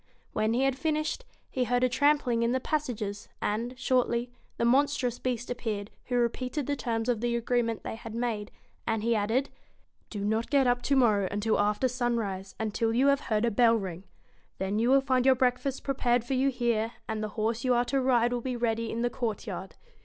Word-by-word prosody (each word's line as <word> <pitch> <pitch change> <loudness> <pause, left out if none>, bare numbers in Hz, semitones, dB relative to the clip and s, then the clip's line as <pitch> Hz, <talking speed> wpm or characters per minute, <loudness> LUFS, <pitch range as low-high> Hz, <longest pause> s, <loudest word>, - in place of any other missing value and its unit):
When 215 +1 +1
he 255 - +2
had 270 -1 +2
finished, 310 - -1 0.3
he 255 -1 0
heard 245 +1 +1
a - - +5
trampling 285 -2 +2
in 235 +1 +2
the 260 - +1
pass 300 +2 -1
ages, 210 -3 -5
and, 235 +4 -2
shortly, 245 -2 +1 0.3
the 235 - +1
monstrous 260 -1 +2
Beast 245 -1 -2
appeared, 220 -4 -3
who 250 - -2
repeated 250 +4 0
the 285 - -1
terms 225 -4 -2
of 235 -3 +1
the 240 0 0
agreement 235 -1 0
they - - -4
had 225 0 -8
made; 230 -3 -2 0.4
and 225 -2 0
he 235 +1 +2
added 225 +6 +1
1 - - -32 0.6
Do 205 -2 -4
not 220 +2 0
get 275 -1 +4
up 245 0 +2
to 280 - +1
morrow 215 -7 +4
until 210 +2 0
after 210 +5 +2
sunrise, 230 -6 -2
and 220 -2 -2
till 225 +1 0
you 270 +3 +4
have 280 0 +3
heard 215 +1 +2
a 235 - +1
bell 230 +2 +5
ring. 190 -3 -4 0.5
Then 195 +3 -1
you 235 +2 +2
will 270 +1 +6
find 260 -2 +2
your 265 0 +5
breakfast 255 +2 0
prepared 245 -3 +1
for 240 - -3
you 265 +1 +3
here, 235 -3 0
and 220 -1 -3
the 215 - -2
horse 225 +2 0
you 255 -1 +3
are 240 +1 +2
to 270 +2 0
ride 245 -2 +3
will 245 - -1
be 255 0 -3
ready 230 -1 -1
in 230 +1 -2
the 240 - +2
court 230 -4 -3
yard. - - -6
240 Hz, 220 wpm, -29 LUFS, 225-255 Hz, 0.6 s, will